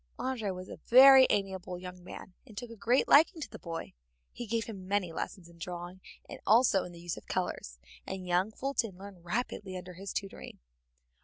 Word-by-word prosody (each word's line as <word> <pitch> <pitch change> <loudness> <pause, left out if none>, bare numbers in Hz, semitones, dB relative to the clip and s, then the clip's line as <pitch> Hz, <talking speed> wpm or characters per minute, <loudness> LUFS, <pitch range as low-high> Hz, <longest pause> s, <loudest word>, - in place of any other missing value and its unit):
André 240 -6 -2
was 185 +1 -8
a - - -9
very 265 +1 +9
amiable 190 -3 -2
young 180 0 -9
man, 185 0 -10
and 215 -4 -15
took 240 0 -6
a - - -9
great 235 +4 +2
liking 320 +4 +6
to 305 - -5
the - - -9
boy. 165 -1 -6 0.4
He 240 - -7
gave 225 +1 0
him 195 -5 -9
many 195 -4 0
lessons 170 +1 -5
in 170 0 -18
drawing, 175 +2 -7 0.3
and - - -9
also 220 -3 +5
in 180 - -9
the 170 - -12
use 175 0 -5
of - - -12
colors, - - -3 0.3
and 190 -1 -5
young 180 +3 +1
Fulton 230 -6 -2
learned 190 -2 -12
rapidly 190 0 -3
under 180 0 -9
his 195 +2 -7
tutoring. 195 - -6
190 Hz, 200 wpm, -31 LUFS, 180-230 Hz, 0.4 s, very